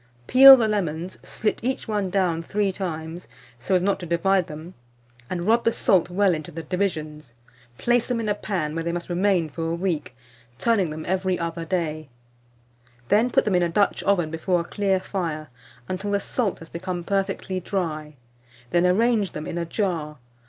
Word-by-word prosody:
Peel 270 - +10
the 230 -3 +2
lemons, 180 -4 -2
slit 220 - -2
each 260 +2 -2
one 205 -3 -1
down 180 -3 +1
3 200 +3 0
times, 170 -2 -5 0.3
so 185 +10 0
as 180 - +2
not 200 +1 +1
to 175 - -7
divide 180 +2 +2
them, 155 +4 -9 0.6
and 175 -2 -3
rub 230 +5 +3
the 230 - +3
salt 185 -6 +2
well 190 +1 +2
into 155 0 -5
the 165 0 -7
divisions; 155 -7 -3 0.4
place 240 0 +1
them 245 -2 -1
in 225 - -3
a 205 - +2
pan, 185 -7 -3
where 165 0 -3
they 170 - -1
must 175 +1 -5
remain 180 -2 +2
for 165 +2 -4
a 165 - -1
week, 170 -8 -2 0.4
turning 205 - +2
them 155 +1 -6
every 185 0 0
other 170 0 -4
day; 155 -4 -2 1.0
then 220 +4 +4
put - - +2
them 210 - +1
in 180 - +3
a 175 - +1
Dutch 200 +4 +1
oven 175 -6 +1
before 170 +2 0
a - - -4
clear 195 +1 0
fire 165 -6 -4 0.4
until 190 +2 -3
the 200 0 +1
salt 210 0 -1
has 165 - -12
become 175 0 -4
perfectly 195 0 -2
dry; 155 -5 -3 0.6
then 175 +1 +3
arrange 215 +1 +2
them 150 - -5
in 170 - -4
a 170 - -2
jar. 165 -5 -2
180 Hz, 190 wpm, -24 LUFS, 165-200 Hz, 1.0 s, Peel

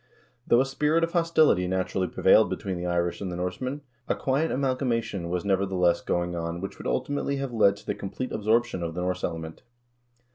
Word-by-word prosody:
Though 120 - +5
a - - +1
spirit 150 +4 +1
of 165 - 0
hostility 160 - +3
naturally 95 0 -1
prevailed - - +4
between 95 -2 -3
the 90 0 -3
Irish 85 0 -1
and 95 -2 -3
the - - -4
Norsemen, 125 +11 -3 0.3
a - - +1
quiet 140 +5 0
amalgamation 125 -9 -1
was, 90 +1 -2
nevertheless, 95 -3 +2
going 85 0 -1
on 85 0 -3
which 95 +2 -6
would - - -5
ultimately 145 0 -1
have 135 -2 -4
led 100 -3 +4
to - - -16
the - - -1
complete 125 +6 -5
absorption 110 -1 +1
of 85 -1 -4
the 90 - -2
Norse 90 0 -2
element. 80 -1 -4
95 Hz, 190 wpm, -26 LUFS, 90-130 Hz, 0.3 s, Though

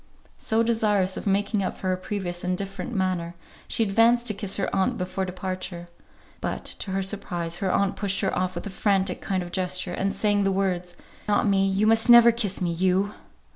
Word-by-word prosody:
So, 225 +1 +1
desirous 210 -5 +1
of - - -5
making 200 +1 +1
up 190 - -3
for 185 - -3
her 185 - +2
previous 185 -2 -4
indifferent 195 +6 -3
manner, 185 -5 -1 0.3
she 230 - +1
advanced 230 +3 +3
to 220 - 0
kiss 200 -1 -2
her 195 - 0
aunt 190 -1 +1
before 185 +1 -3
her 190 - -1
departure. 185 -1 -5 0.6
But, - - -3
to - - -6
her 195 0 -1
surprise, 175 -4 -4
her 190 0 -1
aunt 200 0 +1
pushed 200 -1 -1
her 195 - 0
off 185 0 -1
with 175 - -5
a 205 - -5
frantic 195 -1 0
kind 190 -2 -1
of 175 - -9
gesture, 185 0 -2
and 195 +2 -1
saying 205 0 +1
the 195 - +2
words, 180 -2 -1 0.3
"Not 210 0 +2
me. 195 -1 +3
You 195 +2 +1
must 225 +2 +4
never 235 0 +9
kiss 215 -5 -3
me. 175 -2 0
You!" 185 +3 +1
195 Hz, 205 wpm, -25 LUFS, 185-205 Hz, 0.6 s, never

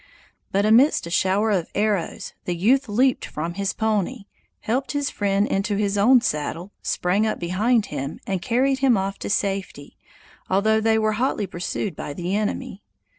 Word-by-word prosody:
But 200 +1 +2
amidst 235 - +4
a 170 - -7
shower 195 +4 +2
of 185 -5 0
arrows 205 -4 -1
the 175 - -1
youth 240 +8 +2
leaped 250 +5 +2
from 165 +3 -4
his 195 +2 -1
pony, 210 -3 -1 0.4
helped 255 +6 -1
his 285 -1 -1
friend 200 0 +1
into 200 +2 -1
his 200 0 0
own 240 +5 +5
saddle, 165 0 -3
sprang 195 +5 0
up 215 - -1
behind 210 +6 +1
him, 140 0 -4
and 190 -2 -2
carried 260 +5 +1
him 260 -4 +4
off 195 +1 -2
in - - -4
safety, 195 -8 -2 0.5
although 215 +3 +2
they 220 0 +3
were 215 0 +2
hotly 255 -5 0
pursued 180 0 -4
by 145 - -6
the 180 +4 -3
enemy. 215 +1 -3
205 Hz, 170 wpm, -23 LUFS, 185-225 Hz, 0.5 s, own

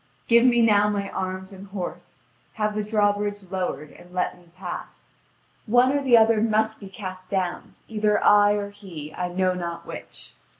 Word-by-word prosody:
Give 235 0 +6
me 240 -1 +4
now 210 -2 +4
my 200 -1 -2
arms 190 +1 -4
and 195 +1 -11
horse! 190 -2 -7 0.3
Have 210 -1 -1
the 210 0 -2
drawbridge 205 -1 0
lowered, 180 -5 -3
and 175 0 -16
let 180 0 -1
me 175 -1 -21
pass. 180 -2 -8 0.6
One 245 +4 +5
or 285 0 +1
the 255 -4 +6
other 225 -1 +4
must 220 0 +1
be 195 - -10
cast 185 -2 -8
down, 185 -2 -2
either 210 -1 +1
I 205 0 +6
or 205 -1 -3
he, 175 -7 -9
I 180 - -2
know 185 +1 +1
not 170 -1 -5
which. - - -9
205 Hz, 175 wpm, -24 LUFS, 185-215 Hz, 0.6 s, Give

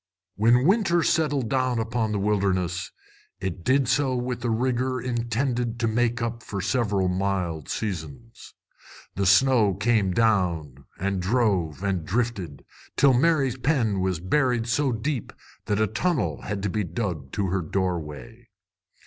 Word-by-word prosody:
When 120 +5 +4
winter 185 -3 +3
settled 145 -7 +1
down 130 -1 0
upon 115 -1 -1
the 105 - 0
wilderness, 95 -3 0 0.5
it 90 -2 -4
did 130 +4 +2
so 130 +1 +1
with 125 0 -3
a 120 - 0
rigor 130 +2 0
intended 120 0 -2
to 115 - +1
make 115 +1 0
up 115 0 -3
for 100 -3 -5
several 100 -1 0
mild 90 -4 -2
seasons. 100 +2 -6 0.6
The 100 -1 0
snow 105 -1 +4
came 105 -1 +1
down, 90 - 0
and 95 0 -1
drove, 95 - 0
and 95 -4 -1
drifted, 95 - -3 0.3
till 140 -2 +5
Mary's 135 -2 +2
pen 125 -8 +1
was 95 -3 0
buried 120 - +1
so 130 +4 +1
deep 125 +2 -3 0.3
that 105 0 0
a 110 - +4
tunnel 135 - -1
had 100 -2 -4
to 105 - 0
be 105 +1 -1
dug 85 - -4
to 100 -2 -1
her 95 +1 0
doorway. 90 +6 -4
110 Hz, 145 wpm, -25 LUFS, 95-125 Hz, 0.6 s, till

